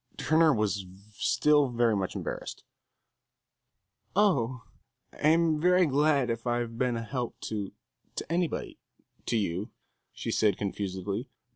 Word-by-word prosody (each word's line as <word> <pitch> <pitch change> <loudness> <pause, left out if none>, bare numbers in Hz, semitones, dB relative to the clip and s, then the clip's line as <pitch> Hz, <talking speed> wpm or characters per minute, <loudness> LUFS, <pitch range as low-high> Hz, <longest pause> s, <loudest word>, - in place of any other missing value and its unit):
Turner 160 0 +4
was 105 -6 0 0.3
still 145 +6 +3
very 120 -2 +2
much 95 -2 -2
embarrassed. - - -5 1.5
"Oh, 130 - +2 0.5
I'm 160 0 +3
very 180 +1 +5
glad 140 -3 +2
if 115 +1 -4
I've 120 -1 -1
been 125 0 0
a 115 - -3
help 120 +2 -4
to 105 -3 -4 0.4
to - - -5
anybody 170 -1 -1 0.5
to 115 - +1
you," 95 -1 -2 0.4
she - - -4
said, 105 -4 +2
confusedly. 100 +3 -3
120 Hz, 120 wpm, -29 LUFS, 105-150 Hz, 1.5 s, very